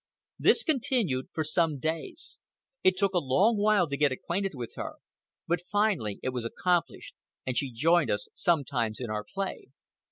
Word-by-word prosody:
This - - +5
continued 245 - 0
for 160 - -1
some 155 -1 +1
days. 165 - -5 0.4
It 185 0 +4
took 195 0 +3
a 180 - +3
long 180 - +3
while 205 -4 +3
to 140 - -2
get 145 0 +2
acquainted 185 +8 -2
with 120 -3 -6
her, - - -5 0.5
but 175 +1 +1
finally 180 - 0
it - - 0
was 125 -2 -3
accomplished 175 +9 -1 0.3
and 130 - -2
she 135 0 -1
joined 160 +7 +3
us 105 - -1
sometimes 125 -9 0
in 120 -4 -4
our 105 -1 -2
play. 195 - -5
165 Hz, 165 wpm, -28 LUFS, 130-195 Hz, 0.5 s, This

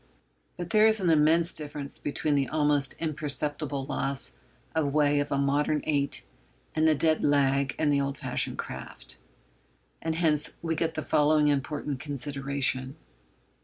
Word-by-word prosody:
But 175 -1 -6
there 215 0 +6
is 220 0 +3
an 180 -3 +2
immense 160 +3 +3
difference 145 -2 -2
between 145 +1 -1
the 140 -2 +2
almost 145 -3 +1
imperceptible 150 -2 -2
loss 135 - -1 0.4
of 155 -3 0
way 145 -1 +3
of 145 - -2
a 140 - +1
modern 145 +2 +1
eight 140 -2 -1 0.5
and 160 0 +2
the 155 - +4
dead 160 +1 +2
'lag' 140 -1 +2
in 150 -2 +2
the 140 -1 +2
old 140 0 -2
fashioned - - -2
craft. - - -7 0.8
And 160 -1 -2
hence 155 -3 +1
we 165 -1 -1
get 160 +1 -1
the 155 - -3
following 150 0 +3
important 145 0 -2
consideration. 140 -2 -3
145 Hz, 150 wpm, -28 LUFS, 140-155 Hz, 0.8 s, there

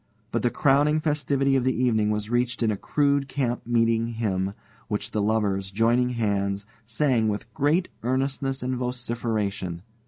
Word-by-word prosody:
But - - 0
the 120 - +2
crowning 145 +4 +3
festivity 140 -3 +1
of 130 - +2
the 130 -2 0
evening 110 -4 +2
was 105 0 -1
reached 120 0 0
in 110 - +2
a 105 - -2 0.2
rude 140 -1 +3
camp 125 -4 -2
meeting 115 -1 +2
hymn, 100 -4 -2 0.3
which 105 -2 -3
the 105 - 0
lovers, 100 -3 0
joining 115 +5 +2
hands, 100 -2 0 0.2
sang 115 -2 +2
with 105 +2 -3
great 155 +8 +2
earnestness 135 +1 -1
and 130 +1 -1
vociferation. 115 -8 -2
120 Hz, 155 wpm, -25 LUFS, 105-135 Hz, 0.3 s, crowning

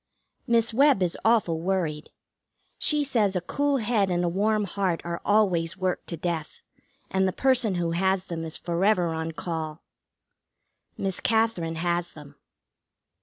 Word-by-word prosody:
Miss 230 -1 +2
Webb 275 -5 +4
is 175 - 0
awful 215 -8 +2
worried. 170 -5 -1 0.7
She 300 -1 +3
says 220 -8 +1
a - - +2
cool 285 +9 0
head 215 -4 +1
and 175 -1 0
a - - +1
warm 210 +4 +1
heart 195 -3 -1
are 170 0 -4
always 185 -5 +2
worked 185 -1 -2
to 170 - -5
death, 165 -2 -4 0.5
and 190 0 +2
the - - 0
person 250 -4 +2
who 170 -1 -1
has 190 +2 +1
them 165 -2 -5
is 160 -1 -3
forever 180 +1 +1
on 160 0 -3
call. 160 -2 -5 1.1
Miss 190 -2 -2
Katherine 220 -8 +1
has 175 +1 -1
them. 145 -2 -12
185 Hz, 150 wpm, -26 LUFS, 170-215 Hz, 1.1 s, Webb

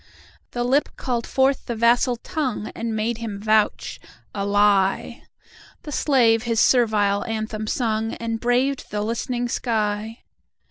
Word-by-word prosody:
The 240 - -1
Lip 270 +4 +2
called 240 -3 -2
forth 270 0 +1
the 235 - -2
vassal 240 +2 +3
Tongue, 260 - -4
And 230 -1 -4
made 220 +2 -1
him 215 -4 -5
vouch—a 215 -1 -1
lie! 200 -1 +2 0.6
The 300 - -7
slave 240 -6 +3
his 230 -2 -1
servile 210 -5 +3
anthem 220 -1 -4
sung, 225 -1 -1
And 230 -1 -4
braved 250 +3 0
the 210 0 -2
listening 240 +2 -2
sky. 220 -1 -2
230 Hz, 130 wpm, -22 LUFS, 215-245 Hz, 0.6 s, vassal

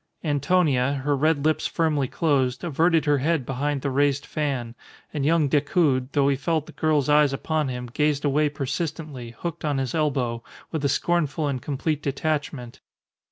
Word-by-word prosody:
Antonia, 145 -3 +2
her 145 -1 +2
red 150 +1 +1
lips 155 0 +2
firmly 155 -5 0
closed, 135 -3 0
averted 165 0 +2
her 145 -1 +3
head 150 -1 0
behind 140 +2 -2
the 140 - -1
raised 140 +1 +1
fan; 135 -6 -2 0.4
and 150 -3 -2
young 160 -2 +3
Decoud, 145 -2 +1
though 140 -1 +3
he 140 - +3
felt 155 +2 -1
the - - -12
girl's 155 -3 +1
eyes 150 -1 +4
upon 155 +2 -1
him, 125 -1 -4
gazed 145 +4 0
away 145 +1 +2
persistently, 145 -4 -4
hooked 170 -1 -5
on 145 -2 0
his 130 -2 -2
elbow, 130 -7 0 0.3
with 160 -3 -3
a 140 - +2
scornful 155 0 0
and 135 -3 -2
complete 150 +1 -2
detachment. 145 -3 -3
145 Hz, 165 wpm, -24 LUFS, 135-155 Hz, 0.4 s, eyes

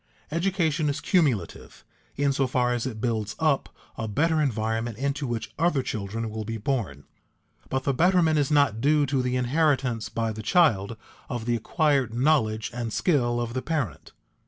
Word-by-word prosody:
Education 165 -3 0
is 145 0 -2
cumulative 145 - -1 0.3
in 140 0 +1
so 135 -1 +1
far 125 -1 +1
as 120 +1 -2
it 110 -4 -6
builds 110 -3 -2
up 155 -4 +1 0.3
a 110 - -3
better 155 +8 +1
environment 115 -3 -1
into 140 +1 -2
which 120 -2 -4
other 160 -5 +2
children 110 +1 -4
will 110 0 -4
be 115 +1 -4
born, 105 - -2 0.7
but 130 0 -1
the 140 - +1
betterment 165 0 +3
is 140 - +1
not 140 -7 +3
due 150 +2 +3
to 135 -1 0
the 125 0 -1
inheritance 130 -3 +1
by 115 -1 -2
the 110 0 -6
child 115 - +2 0.3
of 120 -2 -4
the 120 0 +1
acquired 135 - +1
knowledge 110 -5 +1
and 120 -2 -4
skill 120 - +1
of 120 -1 -3
the 130 - -2
parent. 135 - -3
125 Hz, 170 wpm, -26 LUFS, 115-150 Hz, 0.7 s, betterment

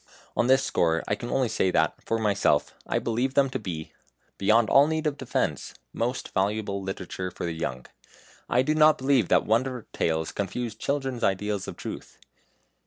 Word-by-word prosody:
On 120 - +2
this 130 +1 +5
score 80 -1 +1
I - - +1
can 120 +3 -4
only 130 -2 +1
say 95 - +1
that, 80 -3 +2
for 115 - -1
myself, 100 -9 +1
I - - 0
believe 120 +3 -1
them 135 -2 +3
to 130 - -2
be 85 -7 -6 0.5
beyond 110 +3 +4
all 140 +7 +6
need 160 0 -1
of 150 -2 0
defence 130 - -2 0.2
most 120 +2 -3
valuable 100 0 0
literature 95 -1 -5
for 90 - -6
the 85 - -2
young. 65 -6 -4 0.6
I 125 +1 +3
do 150 +3 +1
not 155 0 +5
believe 130 -6 +2
that - - +3
wonder 125 +2 0
tales 80 -1 0
confuse 110 +4 -3
children's 135 +1 -2
ideas 100 +1 0
of - - -7
truth. - - -8
110 Hz, 175 wpm, -26 LUFS, 95-130 Hz, 0.6 s, all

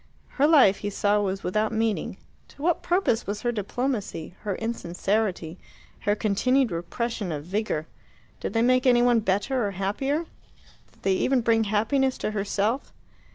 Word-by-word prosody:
Her 285 +1 +2
life, 270 -11 +6
he 205 - -4
saw, 205 +1 +1
was 195 -1 -2
without 215 +4 0
meaning. 225 -1 -1 0.3
To 285 - -13
what 345 0 +2
purpose 350 - +1
was 205 +3 -4
her 240 - +1
diplomacy, 210 - -3
her 205 -3 -3
insincerity, 190 -4 -2 0.4
her 205 - +1
continued 240 +5 +1
repression 200 +3 -3
of 145 -2 -4
vigour? 190 -4 -2 0.5
Did - - -4
they 225 0 +2
make 255 +1 +3
any 240 -1 +5
one 245 -1 +4
better 215 +5 0
or 195 -2 -6
happier? 270 - -1 0.7
Did - - -27
they 195 - +3
even 255 +6 +2
bring 225 -1 +2
happiness 235 +6 +1
to - - -2
herself? 210 +4 -1
215 Hz, 155 wpm, -26 LUFS, 195-250 Hz, 0.7 s, life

